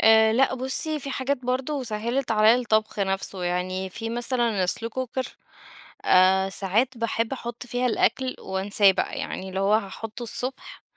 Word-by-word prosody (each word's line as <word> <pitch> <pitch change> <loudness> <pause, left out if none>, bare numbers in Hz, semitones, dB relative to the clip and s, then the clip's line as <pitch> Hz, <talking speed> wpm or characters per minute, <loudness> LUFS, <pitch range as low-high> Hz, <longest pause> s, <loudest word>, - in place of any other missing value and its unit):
آآ، 220 0 +6
لأ 255 +3 +3
بُصّي، 265 +4 -1
في 275 0 -5
حاجات 270 +1 -1
برضه 260 +3 -1
سهِّلت 235 +3 -2
عليَّا 215 +1 +6
الطبخ 220 -4 0
نفسه 195 -1 -2
يعني، 185 +2 -2
في 225 +4 -5
مثلًا 235 -4 0
slow 225 +5 -2
cooker 255 +1 -3 0.8
آآ، 190 +1 +5
ساعات 225 +7 0
باحبّ 230 0 -1
أحُطّ 240 -2 -6
فيها 245 +1 -1
الأكل 255 +2 +1
وانساه 195 +1 +3
بقى، 190 - -2
يعني 190 - -5
اللي 190 0 -3
هو 200 +2 +3
هاحُطُّه 220 +2 -3
الصبح 250 +3 -4
225 Hz, 155 wpm, -25 LUFS, 195-250 Hz, 0.8 s, آآ